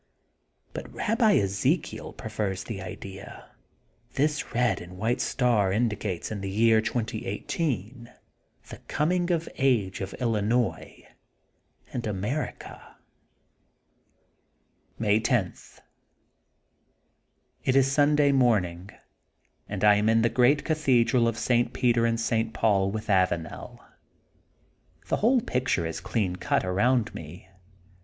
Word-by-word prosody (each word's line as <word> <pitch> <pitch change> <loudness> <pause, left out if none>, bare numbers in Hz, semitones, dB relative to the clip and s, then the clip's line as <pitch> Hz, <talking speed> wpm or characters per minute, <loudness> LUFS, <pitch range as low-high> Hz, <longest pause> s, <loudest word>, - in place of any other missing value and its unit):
' - - -48
' - - -42
But - - -7
Rabbi 225 -1 +2
Ezekiel 100 - 0
prefers 105 -4 -4
the 105 -5 -6
idea 95 +1 -9 0.6
that - - -31
this 150 -2 -1
red 120 -5 +1
and 90 +1 -11
white 115 +5 0
star 115 -7 +1
indicates 105 -4 -2
in 105 -2 -4
the 95 - -4
year 110 +2 +4
2018 115 - -3 0.6
the - - -8
coming 175 +3 0
of 170 -2 0
age 115 -9 +1
of 95 0 -5
Illinois 115 0 -1 0.9
and 125 - -2
Amer^ 105 +8 -2
ica. - - -13 2.0
May 105 -1 +2
10: 110 -5 +1
— - - -23
^It - - -19 1.9
is 135 0 +4
Sunday 145 0 +4
morning, 100 -9 +1 0.8
and 100 -1 -4
I 105 -1 +6
am 105 +1 +2
in 115 0 +3
the 115 - +3
Great 130 +5 +3
Cathedral 130 -6 +2
of 115 -1 -1
St. 120 +1 +1
Peter 120 -2 +2
and 115 0 0
St. 115 0 -1
Paul 100 -3 +2
with 110 +2 -4
Avanel. 90 -5 -1 1.3
The - - +1
whole 245 +3 +3
picture 125 - -1
is 80 0 -4
clean 100 -2 -1
cut 90 - 0
around 110 +6 +1
me. 85 +4 -10
115 Hz, 125 wpm, -26 LUFS, 100-125 Hz, 2.0 s, I